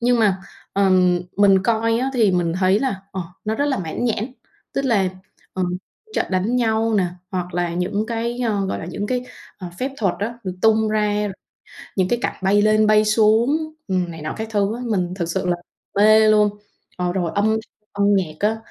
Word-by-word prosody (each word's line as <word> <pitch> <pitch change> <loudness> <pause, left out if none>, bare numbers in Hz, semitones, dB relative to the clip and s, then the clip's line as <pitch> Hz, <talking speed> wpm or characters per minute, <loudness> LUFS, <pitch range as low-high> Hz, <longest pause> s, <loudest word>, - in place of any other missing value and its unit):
Nhưng 240 0 +3
mà, 200 -4 +3 0.3
ờ, 195 -1 +3 0.5
mình 195 -2 +5
coi 230 +1 +2
á, 265 +2 0
thì 220 -6 +4
mình 175 -2 +1
thấy 190 +3 +3
là, 260 -8 -1
ờ, 190 - -3 0.2
nó 220 +1 -1
rất 285 - 0
là 270 -6 0
mãn 175 +7 -3
nhãn. 230 +2 -1 0.4
Tức 275 - 0
là, 205 -7 +2 0.4
ờ, 185 - -2 0.5
trận - - +1
đánh 195 +7 +1
nhau 225 -1 +1
nè, 195 -3 +3 0.3
hoặc 180 -1 -4
là 175 -1 -1
những 200 +5 -1
cái, 235 +1 -2
ờ, 205 -5 0
gọi - - -2
là - - -6
những 200 +4 -4
cái, 250 +1 -1 0.3
ờ, 180 -2 -6
phép 265 +2 -1
thuật 195 -5 0
á, 230 +4 -4
được 185 - -2
tung 220 0 +4
ra, 210 -1 +1 0.7
những 185 -1 +2
cái 240 - +1
cảnh - - -1
bay 205 +2 +3
lên 215 0 +4
bay 215 0 +5
xuống, 230 +9 +3 0.2
ừm, 180 -2 0
này 165 -2 -8
nọ 155 - -4
các 220 0 -4
thứ 205 0 0
á, 245 - -6
mình 180 -5 -1
thực 170 -3 -2
sự 190 +1 -2
là 175 -1 +1 0.4
mê 215 +1 +6
luôn. 210 -1 +5 0.5
Ờ, 180 -1 -1
rồi 175 -3 -1
âm 200 - +2
thanh, 220 0 +2 0.3
âm 200 0 0
nhạc 165 -5 -1
á, 215 +2 +2
210 Hz, 210 wpm, -21 LUFS, 185-225 Hz, 0.7 s, mê